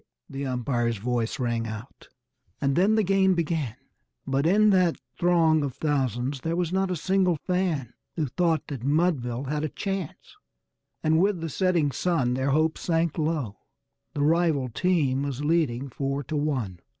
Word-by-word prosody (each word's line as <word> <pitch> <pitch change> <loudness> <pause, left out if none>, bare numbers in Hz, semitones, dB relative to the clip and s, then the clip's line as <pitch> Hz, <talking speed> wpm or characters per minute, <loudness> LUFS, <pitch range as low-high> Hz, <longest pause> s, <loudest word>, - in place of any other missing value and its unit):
the 135 0 -5
umpire's 120 -2 -1
voice 120 +2 -1
rang 120 -2 -1
out, 110 +4 -9 0.5
and 140 -1 +1
then 200 +5 +4
the 220 - +3
game 190 0 +3
began; 160 -8 -1 0.5
But 135 +3 +1
in 210 +4 +5
that 180 -3 +3 0.2
throng 165 -3 +3
of 140 -4 -3
thousands 135 -3 -1
there 165 +3 -1
was 175 0 -1
not 190 0 +1
a 180 - -1
single 185 +1 +2
fan 175 -9 -1 0.2
Who 160 - 0
thought 165 +4 0
that 135 -5 -6
Mudville 140 -5 +1
had 150 +2 -2
a 155 - -1
chance; 195 -3 -5 0.7
and 160 +1 +3
with 195 -2 +2
the 165 0 -4
setting 170 -3 +1
sun 135 -7 0
Their 130 +2 0
hopes 155 +3 +1
sank 165 -1 0
low 150 -10 -1 0.6
the 145 - 0
rival 155 -4 +2
team 145 -2 +1
was 140 0 -3
leading 145 -5 +1
"four 140 +2 -2
to 145 +5 -5
one." 130 - -1
150 Hz, 160 wpm, -26 LUFS, 130-175 Hz, 0.7 s, in